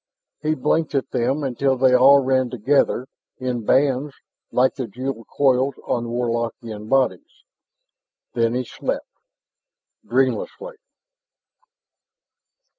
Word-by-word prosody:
He 155 +1 0
blinked 155 +3 0
at 135 - -1
them 130 +5 0
until 135 0 0
they 130 0 +4
all 135 +2 +6
ran 130 -1 +1
together 125 +1 +1 0.3
in 125 -2 -3
bands 135 +3 +1 0.4
like 130 +1 +3
the 130 -4 -5
jeweled 125 +1 -5
coils 135 -1 +2
on 120 -1 -1
Warlockian 115 -2 -3
bodies; 135 - 0 0.9
then 115 0 +1
he 125 0 -1
slept - - -4 1.0
dreamlessly. 130 - -1
130 Hz, 105 wpm, -22 LUFS, 120-135 Hz, 1.0 s, all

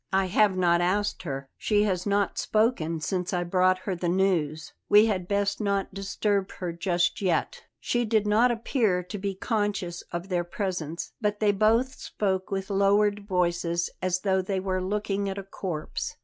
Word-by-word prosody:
"I 190 0 +2
have 190 +1 +3
not 175 -1 +3
asked 205 +4 0
her; 135 -5 -5
she 210 -1 +2
has 185 -2 -1
not 200 0 +1
spoken 215 -8 +1
since 180 +3 -2
I 175 -1 +1
brought 185 +1 +3
her 195 - -2
the 175 0 -2
news. 170 -4 0 0.2
We 210 +1 +7
had 190 -5 -1
best 200 +1 0
not 200 -2 -1
disturb 195 0 -1
her 175 -2 -4
just 175 +1 0
yet." 200 - -1
She 240 0 0
did 220 -2 +1
not 215 +4 +4
appear 225 -5 +1
to 205 +4 -6
be 195 0 -3
conscious 200 -5 -2
of 175 +2 -5
their 175 -2 0
presence, 175 -3 -4
but 210 -1 0
they 210 -1 +4
both 225 +6 +2
spoke 190 -2 -2
with 195 0 -3
lowered 200 +1 +2
voices, 175 -2 0
as 185 0 0
though 190 -2 +2
they 190 +1 -2
were 185 0 -1
looking 200 +1 -1
at 195 - -4
a 200 - -4
corpse. 180 -5 -5
195 Hz, 175 wpm, -27 LUFS, 180-205 Hz, 0.2 s, We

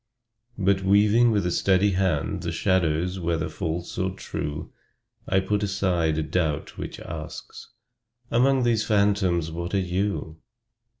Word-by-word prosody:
But 100 0 +2
weaving 105 +5 +4
with 105 -4 +1
a 90 - 0
steady 95 +3 +3
hand 95 +1 0
The 85 -2 -3
shadows, 90 0 +1
whether 85 -2 -1
false 85 +2 -4
or 95 +1 +1
true, 75 -5 -5 0.6
I 95 - +3
put 100 +2 -1
aside 90 -5 0
a 80 - 0
doubt 80 -1 -1
which - - -6
asks 80 -1 -8 0.6
"Among 130 +2 +3
these 115 -2 +2
phantoms 100 -6 +1
what 85 +3 -4
are - - +3
you?" 90 -3 -2
95 Hz, 135 wpm, -25 LUFS, 85-100 Hz, 0.6 s, weaving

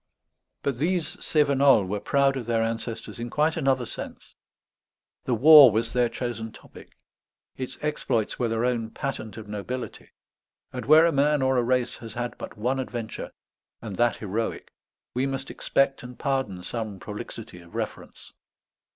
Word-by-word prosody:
But 135 -4 -1
these 170 +2 0
Cévenols 140 - +3
were 105 +2 -2
proud 140 +4 +2
of 125 -4 -5
their 115 -1 +2
ancestors 115 +1 -4
in 120 0 -4
quite 155 +4 +1
another 135 -5 +1
sense; - - -8 0.9
the 125 - +1
war 145 0 +9
was 110 +2 -1
their 125 -1 +2
chosen 115 -2 -4
topic; - - -15 0.6
its 130 -1 -5
exploits 135 -7 -1
were 120 - +1
their 115 +1 0
own 120 -3 0
patent 115 -5 -5
of 110 -1 -8
nobility; 105 +5 -6 0.6
and - - -5
where 155 +3 +8
a 170 - +3
man 145 0 +2
or 130 0 +2
a 125 - +3
race 125 0 0
has 115 -2 -9
had 120 +1 -4
but - - -8
one 125 +5 0
adventure, 120 -3 -5 0.5
and 105 -4 -7
that 120 -2 +3
heroic, 110 +2 -4 0.4
we 130 +2 0
must 135 0 -4
expect 135 0 +1
and 125 0 -10
pardon 130 -10 -2
some 110 0 -4
prolixity 105 -2 -8
of 85 0 -16
reference. - - -6
120 Hz, 160 wpm, -26 LUFS, 115-135 Hz, 0.9 s, war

